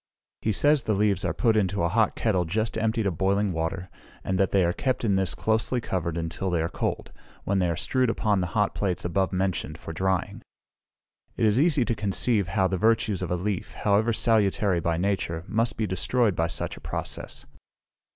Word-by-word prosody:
He 110 - 0
says 145 +7 +4
the 110 -2 0
leaves 105 0 +1
are 90 - 0
put 110 +7 +1
into 100 -3 +1
a - - +3
hot 110 +4 +1
kettle 95 -6 +1
just 110 +7 -2
emptied 110 0 0
of 90 -5 -2
boiling 100 0 +1
water, 85 +3 -3 0.4
and 95 -1 -1
that 95 - +3
they 95 -2 +3
are 85 - +1
kept 130 +2 -1
in 100 -3 +2
this 95 -2 0
closely 110 +3 0
covered 85 -6 -3
until 85 +3 -3
they 85 -2 0
are 80 +1 -1
cold, - - -3 0.3
when 100 0 0
they 90 -2 +1
are 85 - -2
strewed 130 - +1
upon 105 -4 +1
the 90 - -1
hot 105 -1 +2
plates 95 -4 -2
above 90 +1 0
mentioned 90 -5 -2
for 80 - -8
drying. 95 +2 -1 1.0
It - - +2
is 105 +3 +3
easy 150 -5 +3
to 115 - 0
conceive 100 0 +1
how 95 +2 +1
the 95 - -1
virtues 110 -3 +2
of - - -3
a 90 - 0
leaf, 95 +1 -3
however 105 +3 +2
salutary 105 -4 +2
by 85 0 -1
nature, 85 -3 -1
must 115 +2 0
be 110 - 0
destroyed 105 +3 +1
by 80 +1 +1
such 80 -4 -4
a - - -13
process. - - -5
100 Hz, 205 wpm, -26 LUFS, 90-110 Hz, 1.0 s, says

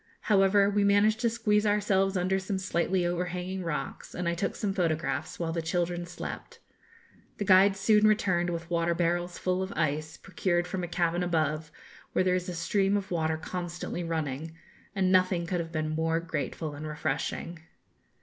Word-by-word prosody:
However, 200 -1 +4
we 205 0 +2
managed 205 +2 +4
to 235 -1 +2
squeeze 215 -2 +1
ourselves 195 -2 +2
under 185 +2 +1
some 190 +1 -3
slightly 185 -1 0
overhanging 180 +1 -2
rocks, 165 -3 -4
and 180 -1 -2
I 170 - +1
took 175 +3 -2
some 205 -3 -1
photographs 165 -4 -1
while 165 -1 -2
the 165 0 -1
children 175 +1 -1
slept. 175 0 -7 0.8
The 205 - -2
guides 195 +1 +5
soon 210 +2 +5
returned 185 -5 +2
with 170 0 -5
water 170 0 +1
barrels 175 +1 0
full 185 0 0
of 190 +1 -3
ice, 155 0 -1
procured 175 -2 -1
from 180 +1 -4
a - - -2
cavern 175 0 0
above, 155 -3 0 0.4
where - - +3
there 185 -1 +2
is 180 0 -1
a 180 - -4
stream 195 +4 +1
of 195 -1 -5
water 160 -2 0
constantly 175 +1 -5
running; 160 -1 -3 0.4
and 190 -1 +2
nothing 185 -2 +3
could 175 +1 -1
have 165 -1 -4
been 155 -2 -2
more 160 +1 0
grateful 155 -1 -4
and 150 +2 -6
refreshing. 155 +2 -3
175 Hz, 175 wpm, -29 LUFS, 165-195 Hz, 0.8 s, guides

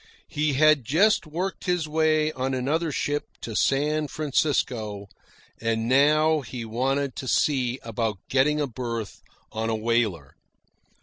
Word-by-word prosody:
He 150 0 0
had 155 0 +4
just 170 - +3
worked 180 +5 -4
his 180 -3 0
way 155 0 +2
on 130 -1 -2
another 150 +6 -1
ship 145 +1 -1 0.2
to 115 - -6
San 150 +5 +1
Francisco; 125 -9 -1 0.5
and 115 0 -1
now 155 +4 +4
he 125 -3 -7
wanted 135 +4 -1
to 130 - -5
see 130 -1 +1
about 115 -2 -2
getting 150 +3 +2
a 145 - +1
berth 115 -4 -5 0.3
on 110 +1 -2
a 110 - 0
whaler. 110 - -1
135 Hz, 135 wpm, -25 LUFS, 115-155 Hz, 0.5 s, had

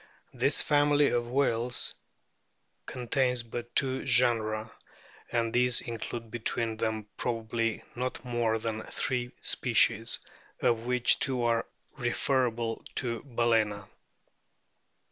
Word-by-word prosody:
This - - +3
family 145 0 +3
of 120 -1 -1
whales 125 -2 0 0.9
contains 125 0 0
but 120 +1 -7
two 130 -2 +5
genera, 110 -4 +1 0.6
and 115 -1 0
these 125 0 +3
include 115 -1 -6
between 115 -1 -1
them 110 -2 -2
probably 115 -1 -2
not 125 0 -4
more 120 -2 0
than 110 0 -3
three 125 -2 -2
species, - - +2 0.4
of 115 0 +1
which 125 -1 +4
two 130 -4 +1
are 115 -1 +1 0.3
refer 130 +1 +1
able 115 -1 -4
to 115 -2 -1
Balcena. 115 -5 0
120 Hz, 105 wpm, -29 LUFS, 115-125 Hz, 0.9 s, two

